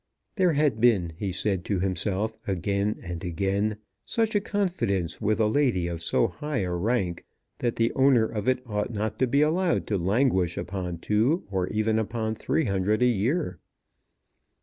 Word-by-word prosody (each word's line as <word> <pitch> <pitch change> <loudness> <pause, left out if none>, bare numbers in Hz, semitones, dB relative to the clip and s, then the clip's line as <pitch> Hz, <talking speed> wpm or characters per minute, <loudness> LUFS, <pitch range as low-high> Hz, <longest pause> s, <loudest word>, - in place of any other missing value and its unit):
There 185 -5 +3
had 140 -7 +1
been, 100 -9 +3
he 95 +3 -3
said 95 0 -1
to 100 -3 0
himself 95 +3 -1
again 100 +2 -1
and 85 -2 -6
again, 100 +5 -1 0.3
such 225 -1 0
a 205 - +2
confidence 175 - -1
with 105 +1 +1
a 110 - +4
lady 110 -6 +2
of 85 -1 -4
so - - +2
high 150 -5 -3
a 90 - -2
rank, 90 -1 -1 0.4
that 120 -2 -1
the 115 +1 +1
owner 130 -4 +4
of 110 +1 -2
it 130 -1 0
ought 105 0 -2
not 110 0 -3
to 130 - +3
be 140 +4 +3
allowed 170 +3 +1
to 100 -3 -1
languish 95 -2 +1
upon 90 -2 -4
two 110 - +1
or 95 -2 0
even 110 +2 +1
upon 110 0 -2
three 160 +7 0
hundred 100 +3 +1
a - - +6
year. 125 - 0
110 Hz, 170 wpm, -26 LUFS, 95-125 Hz, 0.4 s, a